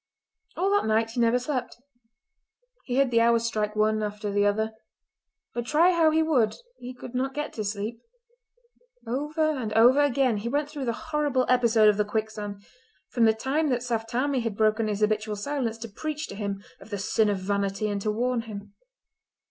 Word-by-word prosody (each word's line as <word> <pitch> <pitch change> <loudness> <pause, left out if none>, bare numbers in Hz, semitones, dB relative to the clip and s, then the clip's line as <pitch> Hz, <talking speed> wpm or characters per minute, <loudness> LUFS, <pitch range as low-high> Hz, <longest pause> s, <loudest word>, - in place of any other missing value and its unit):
All 390 +2 +1
that 410 - +2
night 220 +1 +1
he 240 - -4
never 235 +1 +4
slept. 255 0 -3 1.1
He 245 - -2
heard 275 -2 +3
the 230 -1 +4
hours 230 0 +3
strike 215 -2 -1
one 215 0 +2
after 210 0 -3
the 205 0 +2
other; 220 +2 0 0.8
but 240 0 -4
try 335 +4 +4
how 335 -3 +4
he 320 +1 +2
would 255 -9 +2 0.2
he 250 +1 -8
could 250 - -10
not 265 +2 -2
get 295 0 -3
to 215 - -4
sleep. 210 +3 -4 1.0
Over 300 +6 0
and 250 -8 -3
over 245 +6 +6
again 270 -5 +2
he 220 +3 -3
went 290 +3 -1
through 290 -3 -4
the 245 +7 -4
horrible 285 -4 +1
episode 235 -3 +4
of 210 -1 +4
the 210 - +3
quicksand, 210 -1 -4 0.5
from 235 -2 +3
the 220 - +5
time 275 +7 0
that 245 -2 0
Saft 225 -2 -2
Tammie 265 +3 0
had 225 -3 -3
broken 215 0 +2
his 210 0 -2
habitual 215 0 0
silence 235 0 -2
to 230 0 -7
preach 300 +8 -4
to - - -7
him 200 -1 -4 0.2
of - - -14
the 205 - -3
sin 210 +2 +1
of 200 - 0
vanity 200 +2 -1
and 205 -1 -2
to 215 - -1
warn 240 +3 0
him. 205 -3 -9
230 Hz, 195 wpm, -26 LUFS, 215-265 Hz, 1.1 s, over